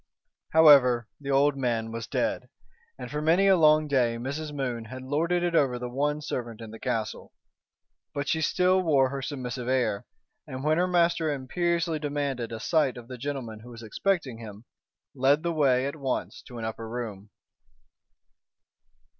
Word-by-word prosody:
However, 135 Hz, -7 st, +6 dB
the 140 Hz, -1 st, -7 dB
old 140 Hz, +1 st, +3 dB
man 115 Hz, -4 st, -1 dB
was 115 Hz, 0 st, -5 dB
dead, -, -, -2 dB, 0.5 s
and -, -, -8 dB
for 150 Hz, 0 st, -2 dB
many 165 Hz, +5 st, +3 dB
a 195 Hz, -1 st, +6 dB
long 155 Hz, -2 st, +5 dB
day 125 Hz, -5 st, +1 dB
Mrs. 140 Hz, +5 st, -4 dB
Moon 125 Hz, -5 st, -3 dB
had 130 Hz, +3 st, -8 dB
lorded 165 Hz, +6 st, 0 dB
it 175 Hz, -1 st, 0 dB
over 135 Hz, -6 st, +2 dB
the 125 Hz, 0 st, -6 dB
one 150 Hz, +3 st, -1 dB
servant 120 Hz, -5 st, -4 dB
in 115 Hz, -2 st, -9 dB
the 110 Hz, -, -10 dB
castle. 110 Hz, -2 st, -3 dB, 0.8 s
But 140 Hz, -1 st, -4 dB
she 160 Hz, +2 st, 0 dB
still 185 Hz, +3 st, +3 dB
wore 140 Hz, -6 st, +3 dB
her 135 Hz, 0 st, -4 dB
submissive 125 Hz, -3 st, -5 dB
air, 120 Hz, -6 st, 0 dB, 0.4 s
and 130 Hz, +1 st, -6 dB
when 155 Hz, +2 st, +2 dB
her 180 Hz, -, +2 dB
master 170 Hz, -3 st, +2 dB
imperiously 170 Hz, +4 st, -1 dB
demanded 140 Hz, -5 st, -3 dB
a 115 Hz, -, -5 dB
sight 140 Hz, 0 st, +1 dB
of 120 Hz, 0 st, -11 dB
the 125 Hz, -, -7 dB
gentleman 125 Hz, -5 st, -5 dB
who 120 Hz, +3 st, -13 dB
was 115 Hz, -1 st, -10 dB
expecting 135 Hz, -, -1 dB
him, 110 Hz, 0 st, -10 dB, 0.5 s
led 140 Hz, +3 st, +2 dB
the 170 Hz, 0 st, -1 dB
way 135 Hz, -4 st, +3 dB
at 140 Hz, -, -3 dB
once 135 Hz, -4 st, -3 dB
to 125 Hz, -, -10 dB
an 115 Hz, -, -4 dB
upper 110 Hz, 0 st, -5 dB
room. 110 Hz, -4 st, -6 dB
135 Hz, 170 wpm, -27 LUFS, 120-155 Hz, 0.8 s, However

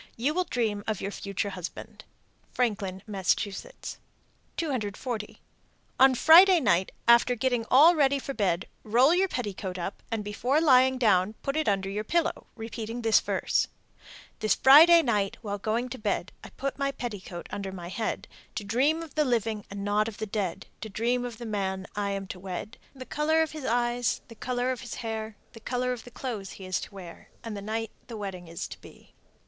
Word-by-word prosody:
You 265 Hz, +6 st, +1 dB
will 365 Hz, +2 st, 0 dB
dream 215 Hz, -7 st, -1 dB
of 215 Hz, -3 st, -1 dB
your 200 Hz, -, -3 dB
future 200 Hz, 0 st, -3 dB
husband. 180 Hz, -2 st, -8 dB, 0.5 s
Franklin, 200 Hz, -6 st, -1 dB
Mass. 195 Hz, -4 st, +1 dB
240. 230 Hz, -, -6 dB, 0.6 s
On 265 Hz, 0 st, +7 dB
Friday 350 Hz, +7 st, +8 dB
night 190 Hz, -, +2 dB, 0.2 s
after 235 Hz, +1 st, +6 dB
getting 245 Hz, -1 st, 0 dB
all 300 Hz, +7 st, +8 dB
ready 280 Hz, -3 st, +3 dB
for 275 Hz, 0 st, -5 dB
bed, 190 Hz, -4 st, 0 dB, 0.2 s
roll 245 Hz, +8 st, +4 dB
your 375 Hz, +2 st, +3 dB
petticoat 200 Hz, -, -4 dB
up, 180 Hz, +2 st, -5 dB
and 225 Hz, -2 st, -2 dB
before 245 Hz, +8 st, 0 dB
lying 260 Hz, -4 st, +5 dB
down 205 Hz, -4 st, +3 dB
put 275 Hz, -, -2 dB
it 310 Hz, 0 st, 0 dB
under 195 Hz, -1 st, 0 dB
your 205 Hz, +2 st, -3 dB
pillow, 335 Hz, +8 st, -1 dB
repeating 225 Hz, +1 st, -6 dB
this 225 Hz, -1 st, +5 dB
verse: -, -, 0 dB, 0.7 s
This 215 Hz, -1 st, +2 dB
Friday 325 Hz, +5 st, +8 dB
night 205 Hz, -5 st, 0 dB
while 205 Hz, -1 st, -3 dB
going 225 Hz, +4 st, -1 dB
to 260 Hz, -, -7 dB
bed, 205 Hz, -4 st, -1 dB
I -, -, -9 dB
put 275 Hz, +1 st, -5 dB
my 275 Hz, 0 st, +1 dB
petticoat 205 Hz, -9 st, -6 dB
under 195 Hz, -1 st, -4 dB
my 175 Hz, -2 st, -7 dB
head, 220 Hz, +5 st, -3 dB, 0.3 s
To -, -, -3 dB
dream 275 Hz, +10 st, +1 dB
of 315 Hz, -4 st, -11 dB
the 305 Hz, -, +2 dB
living 225 Hz, -5 st, -1 dB
and 200 Hz, 0 st, -6 dB
not 210 Hz, +1 st, +2 dB
of 225 Hz, -, -7 dB
the 220 Hz, -, -3 dB
dead, 195 Hz, -3 st, -3 dB, 0.2 s
To 220 Hz, -, -5 dB
dream 240 Hz, +4 st, 0 dB
of 240 Hz, -2 st, -6 dB
the 240 Hz, -, -7 dB
man 195 Hz, -3 st, -2 dB
I 205 Hz, -1 st, -1 dB
am 195 Hz, 0 st, -3 dB
to 185 Hz, -, -6 dB
wed, 190 Hz, +5 st, -6 dB, 0.2 s
The 260 Hz, -1 st, -8 dB
color 315 Hz, +3 st, +2 dB
of 320 Hz, -, -4 dB
his 310 Hz, -4 st, -7 dB
eyes, 240 Hz, 0 st, 0 dB
the -, -, -10 dB
color 250 Hz, +2 st, -1 dB
of 255 Hz, -, -4 dB
his 245 Hz, -, -6 dB
hair, 220 Hz, -1 st, -4 dB, 0.2 s
The 225 Hz, -, -11 dB
color 250 Hz, +2 st, -1 dB
of 240 Hz, -, -8 dB
the -, -, -10 dB
clothes 230 Hz, -6 st, -5 dB
he 190 Hz, -, -10 dB
is 185 Hz, 0 st, -1 dB
to -, -, -8 dB
wear, 175 Hz, -3 st, -11 dB
And 225 Hz, -2 st, -5 dB
the 200 Hz, -, -6 dB
night 220 Hz, +2 st, -3 dB, 0.2 s
the 230 Hz, -, -7 dB
wedding 190 Hz, -4 st, -6 dB
is 165 Hz, 0 st, -5 dB
to -, -, -10 dB
be. -, -, -16 dB
225 Hz, 195 wpm, -28 LUFS, 200-255 Hz, 0.7 s, Friday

